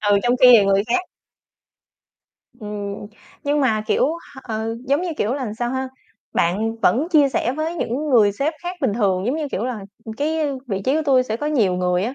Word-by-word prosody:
Ừ, 205 Hz, -1 st, +3 dB
trong 245 Hz, +1 st, +2 dB
khi 255 Hz, -, +8 dB
thì 215 Hz, -4 st, +7 dB
người 195 Hz, 0 st, +3 dB
khác 245 Hz, +10 st, +1 dB, 1.6 s
Ừm, 205 Hz, -1 st, -6 dB, 0.4 s
nhưng 290 Hz, +1 st, +1 dB
mà, 220 Hz, -6 st, +1 dB
kiểu, -, -, +2 dB, 0.3 s
h -, -, -11 dB
ừ, 220 Hz, +1 st, -3 dB
giống 280 Hz, +5 st, +1 dB
như 365 Hz, -, -2 dB
kiểu 225 Hz, +6 st, 0 dB
là 255 Hz, -7 st, -4 dB
sao 240 Hz, 0 st, -1 dB
ha? 260 Hz, 0 st, -2 dB, 0.4 s
Bạn 215 Hz, +7 st, 0 dB
vẫn 290 Hz, +8 st, +2 dB
chia 300 Hz, -5 st, +4 dB
sẻ 250 Hz, -1 st, -1 dB
với 310 Hz, +4 st, -3 dB
những 300 Hz, -1 st, -2 dB
người 215 Hz, -5 st, +5 dB
sếp 280 Hz, +10 st, -1 dB
khác 355 Hz, +1 st, -5 dB
bình 255 Hz, -7 st, +1 dB
thường, 195 Hz, -3 st, +1 dB
giống 260 Hz, -, 0 dB
như 305 Hz, -3 st, -3 dB
kiểu 210 Hz, -, -2 dB
là 250 Hz, -3 st, -3 dB, 0.4 s
cái 310 Hz, +4 st, -1 dB, 0.3 s
vị 195 Hz, -4 st, -3 dB
trí 265 Hz, -, +2 dB
của 315 Hz, -, +1 dB
tui 265 Hz, -3 st, +4 dB
sẽ 220 Hz, -3 st, -3 dB
có 295 Hz, -, -4 dB
nhiều 230 Hz, -12 st, +2 dB
người 180 Hz, 0 st, 0 dB
á, 245 Hz, +4 st, -3 dB
245 Hz, 215 wpm, -21 LUFS, 210-285 Hz, 1.6 s, khi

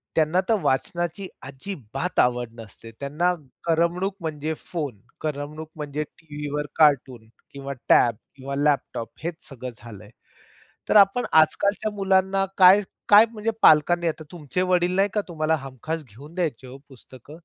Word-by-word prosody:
त्यांना 160 Hz, +3 st, +2 dB
तर 225 Hz, -, +5 dB
वाचनाची 175 Hz, +7 st, -1 dB, 0.2 s
अजिबात 140 Hz, -, -5 dB
आवड 125 Hz, -1 st, +2 dB
नसते. 115 Hz, +1 st, -11 dB
त्यांना 155 Hz, +6 st, 0 dB, 0.3 s
करमणूक 170 Hz, +4 st, 0 dB
म्हणजे 155 Hz, -1 st, -3 dB
फोन, 145 Hz, -, -5 dB, 0.2 s
करमणूक 150 Hz, +1 st, -5 dB
म्हणजे 150 Hz, -1 st, -4 dB
टीव्हीवर 150 Hz, -1 st, -6 dB
कार्टून 130 Hz, -6 st, +2 dB, 0.2 s
किंवा 140 Hz, 0 st, -6 dB, 0.2 s
टॅब 120 Hz, -2 st, +5 dB, 0.2 s
किंवा 140 Hz, +1 st, -6 dB
लॅपटॉप 140 Hz, -5 st, 0 dB
हेच 170 Hz, -1 st, -3 dB
सगळं 130 Hz, -2 st, -7 dB
झालंय. 105 Hz, -3 st, -12 dB, 0.8 s
तर -, -, +3 dB
आपण 200 Hz, +5 st, +5 dB
आजकालच्या 200 Hz, +7 st, +3 dB
मुलांना 195 Hz, -1 st, +2 dB
काय, 190 Hz, +2 st, +8 dB, 0.3 s
काय 210 Hz, +2 st, +9 dB
म्हणजे 220 Hz, 0 st, -2 dB
पालकांनी 170 Hz, +3 st, +5 dB
आता 155 Hz, 0 st, -5 dB
तुमचे 175 Hz, +1 st, -3 dB
वडील 180 Hz, 0 st, +2 dB
नाही 200 Hz, +1 st, +3 dB
का 210 Hz, -, +2 dB
तुम्हाला 160 Hz, -2 st, 0 dB
हमखास 135 Hz, +5 st, -6 dB
घेऊन 145 Hz, +10 st, -14 dB
द्यायचे 155 Hz, -9 st, -2 dB
हो 130 Hz, +1 st, -10 dB
पुस्तक. 130 Hz, 0 st, -16 dB
155 Hz, 140 wpm, -24 LUFS, 135-180 Hz, 0.8 s, काय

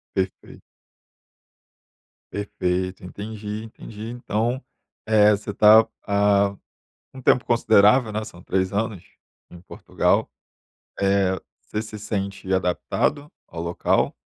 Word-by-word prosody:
Perfeito. 95 Hz, -1 st, -4 dB, 1.7 s
Perfeito, 95 Hz, -2 st, -2 dB
entendi, 105 Hz, +2 st, -6 dB
entendi. 110 Hz, 0 st, -9 dB
Então, 120 Hz, +1 st, -2 dB, 0.4 s
eh, 105 Hz, -1 st, +5 dB
você 105 Hz, 0 st, -2 dB
está 110 Hz, +2 st, +7 dB, 0.2 s
há 100 Hz, -1 st, +3 dB, 0.6 s
um 130 Hz, -, -10 dB
tempo 125 Hz, -, +3 dB
considerável, 110 Hz, 0 st, +4 dB
né, 110 Hz, +1 st, -2 dB
são 90 Hz, -5 st, -12 dB
3 95 Hz, +1 st, -1 dB
anos, 105 Hz, -3 st, -2 dB, 0.5 s
em 85 Hz, -, -13 dB
Portugal. 90 Hz, -, 0 dB, 0.7 s
Eh, 95 Hz, -1 st, +2 dB, 0.2 s
você 105 Hz, -, -4 dB
se 110 Hz, -1 st, -7 dB
sente 100 Hz, -2 st, -4 dB
adaptado 95 Hz, +10 st, 0 dB, 0.2 s
ao 85 Hz, -, -7 dB
local? 85 Hz, +1 st, 0 dB
105 Hz, 105 wpm, -23 LUFS, 95-110 Hz, 1.7 s, está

